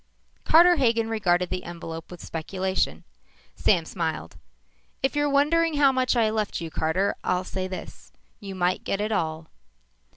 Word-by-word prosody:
Carter 345 +2 +6
Hagen 230 -4 +2
regarded 180 -5 +1
the 180 - -3
envelope 165 -1 -7
with 175 -2 -10
speculation. 185 +3 -2 0.5
Sam 175 -6 +2
smiled. 160 - -4 0.7
"If 270 - +1
you're 290 0 +2
wondering 305 +3 +3
how 285 -2 +5
much 255 -1 +1
I 225 -2 +3
left 215 -2 -2
you, 165 -1 -6
Carter, 170 +7 0
I'll 180 0 0
say 185 0 -4
this: 185 0 -9 0.3
You 195 -3 -7
might 180 0 0
get 195 - -2
it 210 +1 -1
all." 160 -5 -1
195 Hz, 155 wpm, -25 LUFS, 175-255 Hz, 0.7 s, Carter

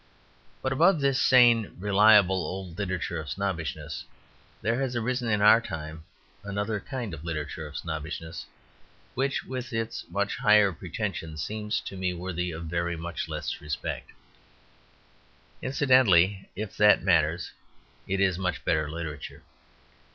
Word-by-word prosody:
But 130 - 0
above 165 +4 +4
this 140 -2 +2
sane 120 -4 +5
reliable 100 -1 +5
old 90 +1 -6
literature 95 -3 -2
of 80 -2 -7
snobbishness 85 -5 -3 0.6
there 115 +5 +1
has 130 -2 -2
arisen 120 +1 -1
in 105 -2 +2
our 110 +2 +7
time 80 -5 -7 0.4
another 100 +2 -2
kind 120 - -5
of 80 -1 -8
literature 80 -1 -4
of 75 - -8
snobbishness 80 0 -5 0.7
which, 135 +2 -1
with 130 -1 -6
its 115 -1 -3
much 100 0 -1
higher 105 -2 +5
pretensions, 85 -3 -4
seems 105 0 -2
to - - -8
me 90 -1 -2
worthy 90 0 -3
of 85 0 -6
very 85 +1 -2
much 85 +1 -5
less - - -4
respect. 75 -1 -4 1.5
Incidentally 110 - +3
(if 105 -1 -5
that 105 0 +5
matters), 85 -2 +2 0.6
it 95 0 -1
is 95 -2 +2
much 90 -4 -2
better 75 -2 +1
literature. 75 -2 -7
95 Hz, 135 wpm, -27 LUFS, 85-110 Hz, 1.5 s, our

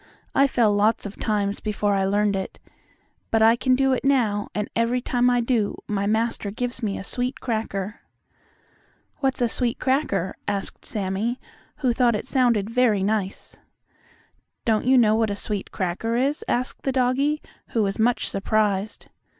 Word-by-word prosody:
I 275 - +5
fell 230 -5 +2
lots 210 +2 +2
of 205 - -8
times 205 -2 0
before 210 -1 0
I 195 -1 +1
learned 205 +1 +2
it. 190 -1 -5 0.7
But 225 -1 +3
I 225 +1 +6
can 255 +1 +2
do 270 0 +2
it 255 - -1
now, 230 -7 +2
and 210 0 -1
every 230 +2 +1
time 245 0 +1
I 245 -1 +2
do 230 -4 0
my 200 -1 -1
master 220 -1 0
gives 245 +3 -4
me 205 -3 -2
a - - -6
sweet 250 +5 -3
cracker." 215 -3 -3 1.2
"What's 265 -3 0
a - - +3
sweet 235 +1 0
cracker?" 260 - 0
asked 200 -1 -3
Sammie, 210 +4 -2 0.5
who 245 - +4
thought 240 -2 +3
it 210 - -3
sounded 240 -6 +2
very 230 -4 +2
nice. 205 -1 -2 1.1
"Don't 225 +1 +1
you 260 0 +6
know 220 -3 +5
what 220 0 +2
a 200 - -2
sweet 205 -1 -4
cracker 190 +6 -2
is?" 275 +5 0
asked 250 +2 -1
the 270 - -1
doggie, 265 +4 +1 0.3
who 225 - 0
was 195 +1 -2
much 235 0 +2
surprised. 205 0 -1
225 Hz, 165 wpm, -24 LUFS, 205-250 Hz, 1.2 s, I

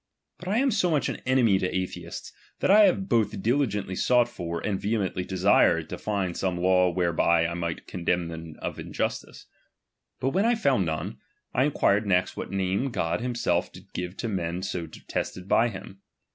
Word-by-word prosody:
But 180 - -9
I 205 +4 +1
am 270 +2 +3
so 200 -5 +2
much 150 -4 +1
an - - -5
enemy 120 -7 +4
to 95 - 0
atheists, 95 0 -5 0.3
that - - +2
I 210 +1 +8
have 190 0 +1
both 110 -4 +1
diligently 105 -6 0
sought 120 +4 +3
for, 85 -8 -5
and 95 0 -2
vehemently 100 -4 -1
desired 90 -3 +3
to - - -4
find 100 -4 -2
some 95 -2 -1
laiv 90 0 +3
whereby 85 -1 +2
1 85 +1 -4
might 85 -1 -3
condemn 90 -1 -1
them 80 -1 -8
of - - -4
injustice. - - -4 0.7
But 130 - +1
when 195 +8 +2
B 240 - +3
found 135 - +2
none, 80 -1 -4 0.3
I 130 - +3
inquired 105 -7 +2
next 90 -1 +1
what - - -5
name 95 +6 0
God 85 -7 -1
himself 120 -1 0
did - - -15
give 90 +1 -5
to 120 - -3
men 90 -3 -2
so 90 -3 -3
detested 90 +3 -5
by 115 +4 +3
him. 95 -1 -10
95 Hz, 185 wpm, -26 LUFS, 90-120 Hz, 0.7 s, I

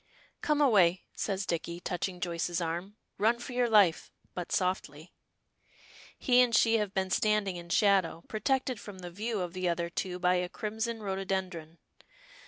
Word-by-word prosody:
"Come 300 -1 +1
away," 190 -9 +4
says 195 -1 -2
Dicky, 170 0 -3
touching 180 +1 -3
Joyce's 175 0 -2
arm. 175 +4 -4 0.2
"Run 230 +3 +3
for 250 +2 -8
your 245 -1 +1
life, 200 -7 +4 0.2
but 180 -1 -5
softly." 175 -4 -2 1.0
He 250 -2 +4
and 240 -2 +3
she 225 +1 +4
have 210 -2 -2
been 190 -1 0
standing 210 -1 +1
in 170 0 -9
shadow, 195 -4 +2
protected 255 +2 -1
from 205 -2 -10
the 180 -1 -8
view 215 +3 -3
of 175 -1 -4
the 185 -1 -1
other 170 0 -2
two 180 +1 -3
by 180 0 +2
a 180 0 -2
crimson 220 +3 -4
rhododendron. 190 -4 -3
190 Hz, 160 wpm, -30 LUFS, 175-215 Hz, 1.0 s, away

